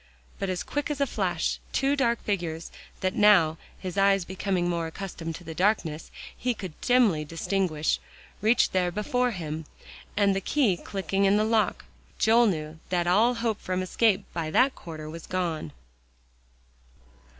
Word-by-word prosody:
But 195 - -2
as 185 -1 -2
quick 290 0 -3
as 295 -2 -2
a 280 - +3
flash, 260 - -1
two 275 +1 +2
dark 235 -4 +1
figures, 170 -5 -3 0.3
that 185 0 0
now, 175 -7 +5 0.2
his 185 0 -4
eyes 195 -2 +4
becoming 185 -1 -1
more 170 -2 -1
accustomed 165 -2 -6
to 175 - -10
the 160 -1 -7
darkness, 170 -4 0 0.3
he 250 -1 -1
could 185 -6 -7
dimly 235 -11 +3
distinguish, 165 0 -1 0.4
reached 225 +3 +3
there 180 -1 +2
before 245 +6 0
him, 160 -6 -5 0.5
and 200 -2 +3
the 195 - -1
key 240 -5 +2
clicking 195 +1 -1
in 195 +1 +4
the 215 - +3
lock, 220 -1 +1 0.3
Joel 230 +2 +5
knew 155 -4 -3
that 175 -1 +1
all 215 +8 +4
hope 230 -2 -1
from 185 0 -2
escape 205 +2 +2
by 165 -2 -2
that 255 - +4
quarter 155 -2 -8
was 165 +1 -8
gone. 170 - -2
190 Hz, 160 wpm, -27 LUFS, 165-220 Hz, 0.5 s, now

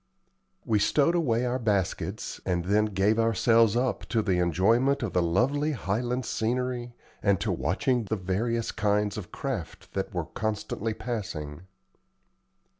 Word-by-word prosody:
We 110 -2 +2
stowed 145 +9 +3
away 125 -9 +1
our 125 +1 -1
baskets 100 -6 -1
and 90 -2 -1
then 105 +3 +3
gave 105 +2 +1
ourselves 115 -1 +4
up 125 -2 0
to 115 -3 +1
the 95 -4 +1
enjoyment 115 - +2
of 110 - -3
the 90 - +3
lovely 135 - +1
Highland 120 +3 -2
scenery, 120 +1 -2 0.3
and 100 -1 +3
to 105 0 -1
watching 105 - 0
the 110 - -1
various 110 +5 -1
kinds 105 0 +1
of 105 -5 -7
craft - - -5
that - - -2
we - - -7
were - - -1
constantly 110 0 -3
passing. 90 -10 -5
110 Hz, 145 wpm, -27 LUFS, 95-120 Hz, 0.3 s, ourselves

